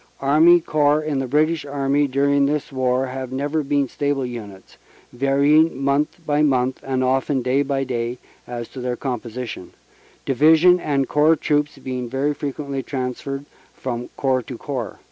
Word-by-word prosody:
Army 155 Hz, +5 st, +5 dB
Corps 150 Hz, -2 st, +2 dB
in 150 Hz, -3 st, -1 dB
the 135 Hz, -, -2 dB
British 155 Hz, +4 st, +1 dB
Army 140 Hz, 0 st, 0 dB
during 140 Hz, +1 st, +2 dB
this 150 Hz, 0 st, -2 dB
war 130 Hz, 0 st, 0 dB
have 130 Hz, 0 st, -6 dB
never 145 Hz, +4 st, -1 dB
been 140 Hz, -1 st, 0 dB
stable 140 Hz, 0 st, -1 dB
units, 105 Hz, -6 st, -9 dB, 0.4 s
varying 140 Hz, +3 st, +3 dB
month 140 Hz, +2 st, +1 dB
by 150 Hz, 0 st, +1 dB
month 130 Hz, -3 st, +1 dB
(and 130 Hz, -1 st, -1 dB
often 130 Hz, +1 st, +1 dB
day 130 Hz, +3 st, +2 dB
by 140 Hz, -1 st, -1 dB
day) 120 Hz, -1 st, -3 dB, 0.3 s
as 120 Hz, -1 st, -5 dB
to 130 Hz, -, -8 dB
their 125 Hz, 0 st, -2 dB
composition, 120 Hz, -6 st, -5 dB, 0.5 s
Division 160 Hz, +6 st, +5 dB
and 140 Hz, -5 st, 0 dB
Corps 150 Hz, +2 st, +4 dB
Troops 150 Hz, -1 st, 0 dB
being 125 Hz, -2 st, -5 dB
very 140 Hz, +4 st, 0 dB
frequently 140 Hz, -1 st, -4 dB
transferred 135 Hz, +1 st, -4 dB, 0.3 s
from 120 Hz, -1 st, -4 dB
corps 130 Hz, -2 st, +1 dB
to 125 Hz, +1 st, -8 dB
corps. 130 Hz, -5 st, -5 dB
135 Hz, 155 wpm, -21 LUFS, 130-145 Hz, 0.5 s, Army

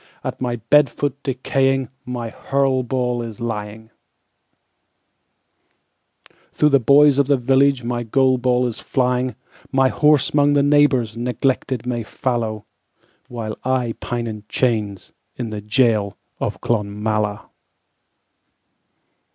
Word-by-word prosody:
At -, -, -5 dB
my 120 Hz, -2 st, -1 dB
bed 135 Hz, +5 st, +3 dB
foot 140 Hz, +3 st, -4 dB
decaying, 135 Hz, -1 st, 0 dB, 0.2 s
My 120 Hz, -2 st, -4 dB
hurl 135 Hz, +1 st, 0 dB
ball 125 Hz, -1 st, -1 dB
is 115 Hz, -3 st, -7 dB
lying; 110 Hz, -1 st, -5 dB, 2.6 s
Through 150 Hz, -, +3 dB
the 140 Hz, -1 st, +4 dB
boys 140 Hz, +3 st, +5 dB
of 140 Hz, -, +3 dB
the 140 Hz, -1 st, +3 dB
villageMy 125 Hz, -2 st, +1 dB
goal 130 Hz, +1 st, +3 dB
ball 125 Hz, 0 st, +1 dB
is 120 Hz, -3 st, -4 dB
flying; 125 Hz, -1 st, -1 dB, 0.4 s
My 135 Hz, -1 st, +3 dB
horse 150 Hz, 0 st, +3 dB
'mong 145 Hz, 0 st, +3 dB
the 140 Hz, -, +4 dB
neighborsNeglected 130 Hz, -3 st, +1 dB
may 120 Hz, -1 st, -2 dB
fallow, 110 Hz, -2 st, -3 dB, 0.6 s
While 110 Hz, -3 st, -5 dB
I 125 Hz, -3 st, 0 dB
pine 120 Hz, -1 st, -3 dB
in 110 Hz, -2 st, -5 dB
my 105 Hz, -, -15 dB
chainsIn 105 Hz, -6 st, -1 dB, 0.4 s
the 105 Hz, -1 st, -5 dB
gaol 105 Hz, -2 st, +1 dB, 0.2 s
of -, -, -3 dB
Clonmala. 105 Hz, -1 st, -2 dB
125 Hz, 115 wpm, -20 LUFS, 115-135 Hz, 2.6 s, boys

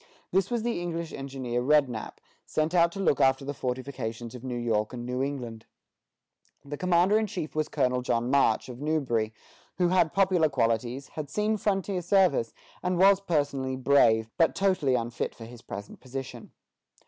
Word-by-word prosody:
This 190 Hz, +1 st, +2 dB
was 240 Hz, -2 st, -1 dB
the 235 Hz, -6 st, -1 dB
English 170 Hz, -1 st, -4 dB
engineer 130 Hz, -3 st, -3 dB
Rednap, 130 Hz, -4 st, +1 dB, 0.3 s
sent 155 Hz, +2 st, -1 dB
out 170 Hz, -1 st, +4 dB
to -, -, -7 dB
look 155 Hz, -7 st, +2 dB
after 135 Hz, +1 st, +3 dB
the 145 Hz, -, -3 dB
fortifications 125 Hz, -3 st, -4 dB
of 125 Hz, -1 st, -9 dB
New 125 Hz, -2 st, -3 dB
York 115 Hz, -1 st, -1 dB
and 120 Hz, -1 st, -6 dB
New 125 Hz, +1 st, -2 dB
England. 125 Hz, -5 st, -4 dB, 1.0 s
The 145 Hz, +1 st, -5 dB
commander 180 Hz, +5 st, +3 dB
in 220 Hz, -, -1 dB
chief 175 Hz, -5 st, -5 dB
was 155 Hz, -1 st, 0 dB
Colonel 125 Hz, 0 st, +1 dB
John 120 Hz, 0 st, 0 dB
March, 140 Hz, -5 st, +3 dB
of 125 Hz, 0 st, -9 dB
Newbury, 130 Hz, -8 st, 0 dB, 0.5 s
who 180 Hz, -1 st, +2 dB
had 175 Hz, -3 st, +3 dB
popular 185 Hz, -5 st, +3 dB
qualities, 120 Hz, +1 st, -1 dB
had 150 Hz, -3 st, -6 dB
seen 210 Hz, +6 st, 0 dB
frontier 195 Hz, -2 st, -1 dB
service, 175 Hz, -, +3 dB, 0.3 s
and 180 Hz, -1 st, 0 dB
was 195 Hz, +1 st, +5 dB
personally 145 Hz, -7 st, -1 dB
brave, 120 Hz, -4 st, +4 dB
but 165 Hz, -, +4 dB
totally 185 Hz, -10 st, +2 dB
unfit 120 Hz, 0 st, -3 dB
for 115 Hz, -, -10 dB
his 120 Hz, 0 st, -12 dB
present 100 Hz, -2 st, -8 dB
position. 135 Hz, +1 st, -7 dB
140 Hz, 170 wpm, -27 LUFS, 125-175 Hz, 1.0 s, was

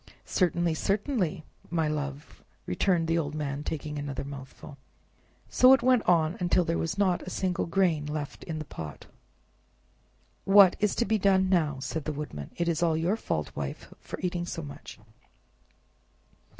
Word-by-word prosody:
"Certainly, 175 Hz, -2 st, +1 dB
certainly, 195 Hz, -, -1 dB, 0.3 s
my 165 Hz, -2 st, 0 dB
love!" 145 Hz, -1 st, -5 dB, 0.2 s
returned 165 Hz, -, +1 dB
the 165 Hz, +1 st, +2 dB
old 150 Hz, -2 st, -3 dB
man, 145 Hz, -1 st, -3 dB
taking 150 Hz, -1 st, -4 dB
another 140 Hz, -1 st, -4 dB
mouthful. 140 Hz, 0 st, -10 dB, 0.7 s
So 255 Hz, +1 st, +6 dB
it 265 Hz, -, +3 dB
went 255 Hz, -2 st, +4 dB
on, 165 Hz, -1 st, +3 dB
till 180 Hz, -, +3 dB
there 165 Hz, 0 st, 0 dB
was 165 Hz, +3 st, -2 dB
not 190 Hz, -3 st, +2 dB
a -, -, -7 dB
single 185 Hz, -2 st, -1 dB
grain 165 Hz, -4 st, +1 dB
left 150 Hz, -1 st, -5 dB
in 160 Hz, -2 st, -4 dB
the 155 Hz, -, -5 dB
pot. 80 Hz, -, -8 dB, 1.4 s
"What's 200 Hz, +1 st, +5 dB
to 235 Hz, -, +1 dB
be 220 Hz, +1 st, +1 dB
done 190 Hz, -1 st, +3 dB
now?" 155 Hz, -6 st, +2 dB
said 155 Hz, +1 st, -4 dB
the 155 Hz, -, -2 dB
Woodman; 140 Hz, -, -6 dB
"it 170 Hz, -, 0 dB
is 170 Hz, -1 st, 0 dB
all 165 Hz, -2 st, +2 dB
your 170 Hz, +6 st, +1 dB
fault, 75 Hz, -, -3 dB
Wife, 70 Hz, -1 st, -6 dB
for -, -, -8 dB
eating 175 Hz, -1 st, -2 dB
so 165 Hz, -, -5 dB
much." 145 Hz, 0 st, -10 dB
165 Hz, 160 wpm, -28 LUFS, 150-185 Hz, 1.4 s, So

